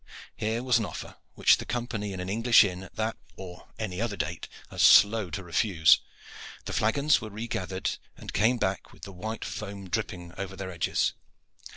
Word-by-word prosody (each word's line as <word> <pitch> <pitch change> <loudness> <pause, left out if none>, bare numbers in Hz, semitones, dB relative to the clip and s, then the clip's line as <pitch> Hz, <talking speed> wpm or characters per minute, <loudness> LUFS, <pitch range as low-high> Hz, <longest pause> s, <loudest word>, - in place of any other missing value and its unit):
Here 110 +3 -2
was 125 -3 +3
an 110 - -1
offer - - -8 0.2
which - - +5
the - - -6
company 115 -3 -3
in 95 - -6
an 90 - -4
English 115 +4 +5
inn 90 -3 -3
at 95 - -12
that 110 +1 -2 0.2
or 90 -2 -10
any 100 -3 -4
other 110 -4 -2
date 80 +2 -4 0.2
are - - -8
slow 105 -2 +6
to 85 +4 -5
refuse. 85 -2 +4 0.7
The - - -5
flagons 140 +7 +2
were 110 - -6
re 110 +3 -6
gathered 95 -3 -3 0.2
and - - -9
came 115 +4 +3
back 95 -4 -2
with - - -19
the 100 - -7
white 110 +5 -5
foam 100 -2 -6
dripping 90 -6 -3
over 95 -1 -5
their 95 -1 -6
edges. 85 -2 0
100 Hz, 190 wpm, -28 LUFS, 95-110 Hz, 0.7 s, slow